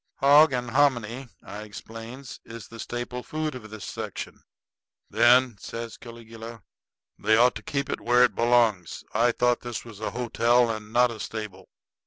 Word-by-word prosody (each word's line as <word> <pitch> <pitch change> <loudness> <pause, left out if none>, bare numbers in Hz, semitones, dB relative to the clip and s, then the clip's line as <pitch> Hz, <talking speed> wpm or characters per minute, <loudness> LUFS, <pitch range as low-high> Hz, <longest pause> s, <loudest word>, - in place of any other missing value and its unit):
"Hog 145 +2 +6
and 125 -2 -2
hominy," 130 -2 +1 0.2
I 105 - -8
explains, 115 +5 -9
"is 115 -1 -10
the 115 - -11
staple 120 +2 -5
food 155 +2 -3
of 120 -4 -9
this 110 -1 -8
section." - - -6 0.7
"Then," 120 -2 +4
says 115 +1 -7
Caligula, 115 -2 -11 0.6
"they 110 +1 +3
ought 125 +1 +5
to 110 - -8
keep 140 +4 -3
it - - -3
where 120 +1 +4
it 120 -4 +3
belongs. 115 -6 +2
I 120 +3 +3
thought 120 +1 +1
this 120 -1 -6
was 110 -4 -11
a 110 - -2
hotel 120 0 +2
and 110 -1 -7
not 120 +1 +4
a 110 - -8
stable. 105 -4 -7
120 Hz, 165 wpm, -26 LUFS, 110-125 Hz, 0.7 s, Hog